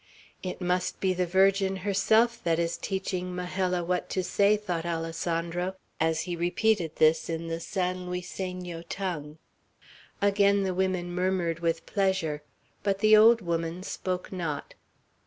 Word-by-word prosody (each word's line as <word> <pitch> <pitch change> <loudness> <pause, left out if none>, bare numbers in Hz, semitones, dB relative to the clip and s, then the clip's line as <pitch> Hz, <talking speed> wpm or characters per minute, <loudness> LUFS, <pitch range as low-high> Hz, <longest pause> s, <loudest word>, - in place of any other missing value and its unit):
"It 185 - -5
must 180 0 0
be 190 -1 +2
the 180 0 0
Virgin 195 +1 +3
herself 220 +4 +3
that 165 -1 +2
is 170 0 0
teaching 185 -2 -3
Majella 180 0 -1
what 180 +1 -1
to 185 - -1
say," 200 +3 +3
thought 180 -6 -3
Alessandro, 170 +2 -2 0.2
as 160 0 +1
he 175 -1 -3
repeated 175 0 +1
this 155 +1 +3
in 165 0 -3
the 165 0 -2
San 180 0 -2
Luiseno 180 -1 -5
tongue. 160 -6 -4 0.8
Again 200 0 +3
the 190 -1 0
women 180 -1 -1
murmured 180 -2 0 0.2
pleasure, 190 -7 0 0.4
but 195 -1 +1
the 215 +2 +6
old 225 +2 +7
woman 170 0 -2
spoke 185 -2 -4
not. 165 -6 -4
180 Hz, 140 wpm, -28 LUFS, 170-195 Hz, 0.8 s, old